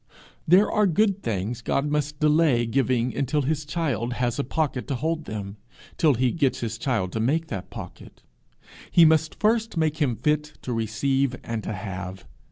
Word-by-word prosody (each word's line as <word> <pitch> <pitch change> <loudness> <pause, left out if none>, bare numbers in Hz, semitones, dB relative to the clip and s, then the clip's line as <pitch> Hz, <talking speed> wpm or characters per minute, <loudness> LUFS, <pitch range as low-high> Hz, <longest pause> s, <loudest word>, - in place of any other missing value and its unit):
There 185 +6 +6
are 210 -2 +3
good 200 +2 +2
things 110 +3 -3
God 140 +3 0
must 150 0 -1
delay 150 -5 +3
giving 125 0 0
until 140 +2 0
his 155 +2 -1
child 140 -7 -2
has 120 +1 -1
a - - +1
pocket 140 -2 -2
to 140 - -1
hold 160 +4 -2
them 100 -1 -6 0.4
till 150 -5 +3
he 125 +1 +2
gets 140 -5 0
his 115 -1 -4
child 110 -9 -1
to 110 - -3
make 155 +8 0
that 95 -3 -5
pocket. - - -10 0.7
He 170 - +6
must 160 0 +2
first 225 -1 +1
make 155 -1 +1
him 140 -7 +1
fit 150 +2 -1
to 125 - -3
receive 130 +4 0
and 115 -2 -4
to - - -3
have. 95 -1 -6
140 Hz, 175 wpm, -25 LUFS, 115-155 Hz, 0.7 s, There